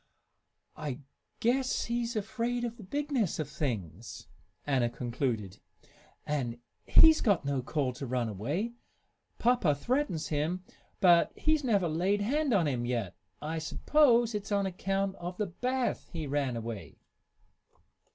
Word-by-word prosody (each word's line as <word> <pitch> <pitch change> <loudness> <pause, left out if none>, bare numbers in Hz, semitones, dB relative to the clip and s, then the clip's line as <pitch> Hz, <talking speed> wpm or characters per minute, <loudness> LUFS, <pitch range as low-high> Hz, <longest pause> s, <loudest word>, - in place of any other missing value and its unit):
"I 145 -2 -5 0.4
guess 255 +3 +1
he's 235 0 -2
afraid 235 +3 -1
of 235 -1 -3
the 220 - -10
bigness 280 - -1
of 155 - -2
things," 110 - -4 0.4
Anna 130 -4 +2
concluded. 120 -5 -3 0.7
"And 125 -6 -2 0.3
he's 320 -1 +7
got 200 -9 +2
no 140 -2 0
call 130 0 -1
to 130 +2 -6
run 125 -1 0
away. 145 - -2 0.6
Papa 230 -11 +3
threatens 240 - -1
him, 160 +5 -1 0.4
but 175 -2 +6
he's 310 -1 +1
never 205 -8 +2
laid 185 +6 +1
hand 285 +6 +1
on 185 -8 +3
him 125 -4 -1
yet. 120 -6 -2 0.3
I 160 +2 -2
s'pose 240 - +3
it's 210 0 -4
on 200 -1 +2
account 195 +1 -1
of 175 +1 -6
the 210 - 0
bath 250 +8 -2
he 160 -3 -4
ran 140 -3 -1
away." 115 -3 -6
175 Hz, 135 wpm, -30 LUFS, -, 0.7 s, he's